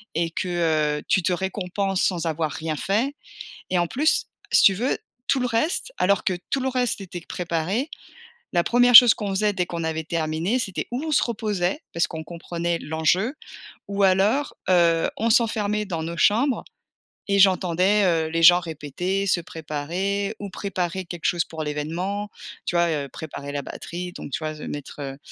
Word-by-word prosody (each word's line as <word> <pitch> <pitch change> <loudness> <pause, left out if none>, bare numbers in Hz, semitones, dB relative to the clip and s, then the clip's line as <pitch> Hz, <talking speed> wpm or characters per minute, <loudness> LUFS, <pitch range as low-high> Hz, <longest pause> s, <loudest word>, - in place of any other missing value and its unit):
et 165 +1 +1
que, 185 - -3 0.5
heu, - - -12
tu 185 - +2
te 185 +1 +1
récompenses 190 +1 -2
sans 175 -3 0
avoir 160 -1 -1
rien 160 +1 -3
fait 230 - 0 0.6
et 185 - +2
en 175 - +2
plus 295 - +1 0.3
si - - +6
tu 195 - +7
veux 240 +8 -1 0.3
tout 275 - +2
le 250 - +1
reste, 275 - -1
alors 200 +1 +2
que 185 - +1 0.2
tout 275 - +1
le 265 - 0
reste 250 -2 0
c'était 180 -3 -7
q - - -24
préparé, 180 - -2 0.7
la 175 -1 +3
1re 245 0 +5
chose 240 0 +11
qu'on 205 - -4
faisait 210 +2 +1
dès 180 -2 0
qu'on 170 -1 -4
avait 160 0 -2
terminé, 165 +7 -1
c'était 195 -6 -3
ou 250 +4 -3
on 315 - -2
se - - +4
reposait 210 -2 -1
parce 170 - +1
qu'on 160 -2 -6
comprenait 170 0 -3
l'enjeu, 160 - 0 0.5
ou 200 0 +1
alors, 200 +9 +2
heu, 170 -2 +4
on 230 +2 +1
s'enfermait 210 -2 +2
dans 170 -4 -3
nos 170 +1 -5
chambres 235 +9 +2 0.7
et 200 0 +3
j'entendais, 190 +1 +4
heu, 165 -3 +2
les 165 +1 -1
gens 175 +1 +9
répéter, 175 +5 -3
se 180 - +2
préparer, 175 +7 -3
ou 200 - -6
préparer 185 -2 -3
quelque 170 -1 -8
chose 170 -2 +2
pour 160 -1 -6
l'évènement, 170 +8 -3 0.4
tu - - -2
vois? 170 0 +3
Heu, 145 -3 -2
préparer 140 -2 -7
la 145 - -2
batterie 175 +6 -6
donc - - -8
tu - - -2
vois? 155 - -2
S 155 - -12
mettre, 145 0 -7
heu, 135 -1 -5
180 Hz, 185 wpm, -24 LUFS, 165-205 Hz, 0.7 s, chose